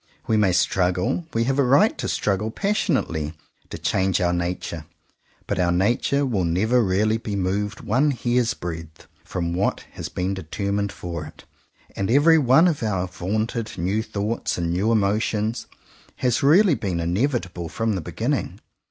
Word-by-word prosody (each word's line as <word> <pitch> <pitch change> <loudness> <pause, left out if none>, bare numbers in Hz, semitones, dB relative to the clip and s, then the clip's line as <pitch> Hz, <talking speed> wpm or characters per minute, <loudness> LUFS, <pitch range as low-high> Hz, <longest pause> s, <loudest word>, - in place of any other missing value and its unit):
We 110 - +1
may 105 -3 +3
struggle, 90 - +1
we 115 - +1
have 135 +3 0
a - - +5
right 140 - +4
to - - -2
struggle 105 +2 0
passionately, 120 - -1 0.3
to - - -6
change 95 -1 +1
our 90 -1 +1
nature; 85 -2 -3 0.6
but - - -2
our 90 -1 +2
nature 120 +10 +1
will 110 -8 0
never 105 +9 +2
really 105 +3 +2
be 110 -3 -4
moved 100 +2 -2
one 130 +8 +2
hair's 120 -3 0
breath 80 -2 -7 0.2
from 85 -1 -3
what 95 +3 0
has - - -6
been 90 +2 -2
determined 100 +3 -2
for 85 -5 -6
it, - - -15 0.5
and 100 - -2
every 155 +6 +5
one 135 +5 +5
of 160 -5 0
our 95 -5 -1
vaunted 110 +5 -3
new 95 +5 0
thoughts 105 +1 -2
and 85 -1 -1
new 100 +6 +1
emo 105 -1 +2
tions 110 +1 -2 0.5
has 125 -2 0
really 170 +6 +5
been 95 -9 -2
inevitable 90 - -1
from 115 +3 -1
the 95 - -2
beginning. - - -2
105 Hz, 160 wpm, -23 LUFS, 90-120 Hz, 0.6 s, a